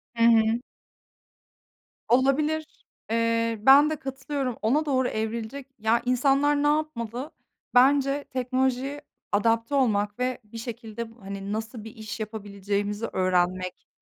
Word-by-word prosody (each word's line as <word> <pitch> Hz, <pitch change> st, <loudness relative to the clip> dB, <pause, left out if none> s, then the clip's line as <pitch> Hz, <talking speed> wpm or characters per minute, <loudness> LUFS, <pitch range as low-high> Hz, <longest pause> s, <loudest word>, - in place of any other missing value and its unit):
Hı 230 Hz, -, +2 dB
hı. 225 Hz, 0 st, +5 dB, 1.5 s
Olabilir. 295 Hz, +5 st, +2 dB, 0.5 s
Eee, 230 Hz, 0 st, +1 dB
ben 275 Hz, +5 st, +7 dB
de 310 Hz, -, -1 dB
katılıyorum. 270 Hz, -2 st, -4 dB
Ona 285 Hz, +8 st, +2 dB
doğru 260 Hz, -3 st, +1 dB
evrilecek. 225 Hz, +5 st, -4 dB
Ya, 220 Hz, +2 st, +2 dB
insanlar 275 Hz, +3 st, +3 dB
ne -, -, +3 dB
yapmalı? 295 Hz, -3 st, -2 dB, 0.4 s
Bence 275 Hz, +2 st, +4 dB
teknolojiye 260 Hz, +2 st, -1 dB, 0.3 s
adapte 230 Hz, +5 st, +1 dB
olmak 210 Hz, -5 st, +1 dB
ve 255 Hz, 0 st, -1 dB
bir 215 Hz, +2 st, -11 dB
şekilde 230 Hz, -1 st, -6 dB
bu, 230 Hz, 0 st, -20 dB
hani, 195 Hz, +1 st, -5 dB
nasıl 220 Hz, 0 st, -5 dB
bir 225 Hz, +1 st, -10 dB
iş 220 Hz, +1 st, -7 dB
yapabileceğimizi 205 Hz, 0 st, -3 dB
öğrenmek 185 Hz, 0 st, 0 dB
235 Hz, 120 wpm, -26 LUFS, 220-270 Hz, 1.5 s, ben